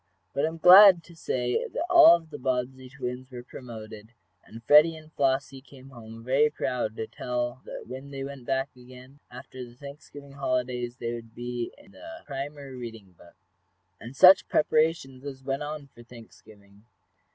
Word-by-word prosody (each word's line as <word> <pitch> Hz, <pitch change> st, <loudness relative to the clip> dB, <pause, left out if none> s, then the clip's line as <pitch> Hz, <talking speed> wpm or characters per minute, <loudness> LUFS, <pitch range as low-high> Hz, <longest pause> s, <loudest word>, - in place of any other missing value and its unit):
But 140 Hz, -, 0 dB
I -, -, +1 dB
am 165 Hz, +1 st, -6 dB
glad 185 Hz, 0 st, +8 dB
to 170 Hz, +1 st, -17 dB
say 125 Hz, -6 st, -2 dB
that 325 Hz, -, -4 dB
all 340 Hz, -, +8 dB
of 165 Hz, -2 st, -9 dB
the -, -, -8 dB
Bobbsey 130 Hz, 0 st, -3 dB
twins 130 Hz, -1 st, -7 dB
were 125 Hz, -2 st, -9 dB
promoted, 110 Hz, -3 st, -11 dB, 0.3 s
and 115 Hz, +1 st, -13 dB
Freddie 150 Hz, +6 st, +6 dB
and 155 Hz, 0 st, -15 dB
Flossie 135 Hz, 0 st, -1 dB
came 135 Hz, -1 st, -16 dB
home 115 Hz, -2 st, -12 dB
very 135 Hz, +5 st, +3 dB
proud 120 Hz, -6 st, -3 dB
to 110 Hz, -, -4 dB
tell 120 Hz, +2 st, -4 dB
that -, -, -8 dB
when 130 Hz, +2 st, -9 dB
they 135 Hz, -1 st, -6 dB
went 135 Hz, -3 st, -9 dB
back 135 Hz, +1 st, -2 dB
again, 130 Hz, +2 st, -15 dB
after 125 Hz, +1 st, -10 dB
the 120 Hz, -1 st, -13 dB
Thanksgiving 140 Hz, +1 st, -12 dB
holidays, 125 Hz, -2 st, -3 dB
they 120 Hz, -1 st, -4 dB
would 115 Hz, -1 st, -10 dB
be 120 Hz, 0 st, -5 dB
in 195 Hz, -, -19 dB
the 325 Hz, +5 st, -12 dB
primer 140 Hz, -1 st, -7 dB
reading 115 Hz, -6 st, -9 dB
book. 85 Hz, 0 st, -20 dB, 0.6 s
And 120 Hz, +4 st, -10 dB
such 185 Hz, +6 st, +7 dB
preparations 155 Hz, -4 st, 0 dB
as 135 Hz, -2 st, -8 dB
went 135 Hz, +1 st, -3 dB
on 150 Hz, 0 st, -6 dB
for 120 Hz, -, -15 dB
Thanksgiving! 105 Hz, -4 st, -17 dB
130 Hz, 175 wpm, -26 LUFS, 120-145 Hz, 0.6 s, glad